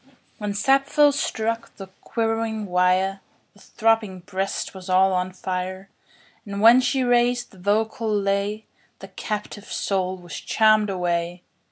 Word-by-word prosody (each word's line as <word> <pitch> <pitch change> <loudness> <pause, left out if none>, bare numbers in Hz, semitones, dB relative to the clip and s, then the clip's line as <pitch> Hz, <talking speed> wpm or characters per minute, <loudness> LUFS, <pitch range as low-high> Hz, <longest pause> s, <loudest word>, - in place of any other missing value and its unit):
1 270 +1 -28 0.2
When 210 -1 -3
Sappho 275 +6 +3
struck 230 -4 -3
the 195 - -8 0.2
quivering 225 -1 -2
wire, 185 +1 +1 0.3
The 205 - -22
throbbing 225 -5 0
breast 190 +1 -3
was 190 -1 -10
all 190 +1 +4
on 180 0 -1
fire; 185 +1 -5 0.5
And 200 -2 -6
when 230 +4 +7
she 255 +1 0
raised 245 0 +2
the 190 - -17
vocal 215 +3 0
lay, 200 +1 -1 0.3
The - - -11
captive 210 -1 -6
soul 190 -1 -1
was 175 -3 -12
charm'd 215 -1 +3
away! 175 -1 -2
205 Hz, 140 wpm, -23 LUFS, 185-225 Hz, 0.5 s, when